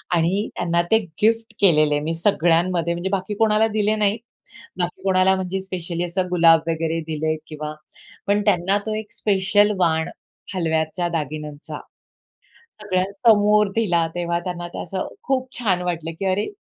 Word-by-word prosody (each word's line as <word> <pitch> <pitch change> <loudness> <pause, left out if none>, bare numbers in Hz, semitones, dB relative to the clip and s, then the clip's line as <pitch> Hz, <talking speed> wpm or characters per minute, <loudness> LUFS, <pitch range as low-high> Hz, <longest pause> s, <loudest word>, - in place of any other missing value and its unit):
आणि 180 +6 +1
त्यांना 170 0 +1
ते 220 - +7 0.2
गिफ्ट 225 +1 +2
केलेले, 155 -6 +4
मी 155 +2 -2
सगळ्यांमध्ये, 170 -1 +1
म्हणजे 175 +3 -3
बाकी 195 +1 -2
कोणाला 220 0 +3
दिले 215 +1 +2
नाही. 210 0 +1 0.6
बाकी 175 -1 -3
कोणाला, 190 0 +3
म्हणजे 190 +1 -3
स्पेशली 175 -2 -4
असं 180 +1 -2
गुलाब 165 -2 +5
वगैरे 165 0 -1
दिले 155 +1 -1
किंवा 150 -1 -6 0.5
पण 205 +1 +2
त्यांना 195 0 +2
तो 215 - -1
एक 215 -1 -5
स्पेशल 205 +1 +2
वाण, 160 -3 +1 0.5
हलव्याच्या 165 0 -1
दागिन्यांचा, 150 -2 -5 1.0
सगळ्यांसमोर 205 +2 +3
दिला. 175 -7 +2
तेव्हा 170 -1 -1
त्यांना 175 -1 -4
ते - - -9
असं 185 +2 -4
खूप 260 -1 -1
छान 190 -7 +1
वाटलं 165 -2 -3
की 195 - -2
अरे, 205 - -1
180 Hz, 145 wpm, -22 LUFS, 165-205 Hz, 1.0 s, ते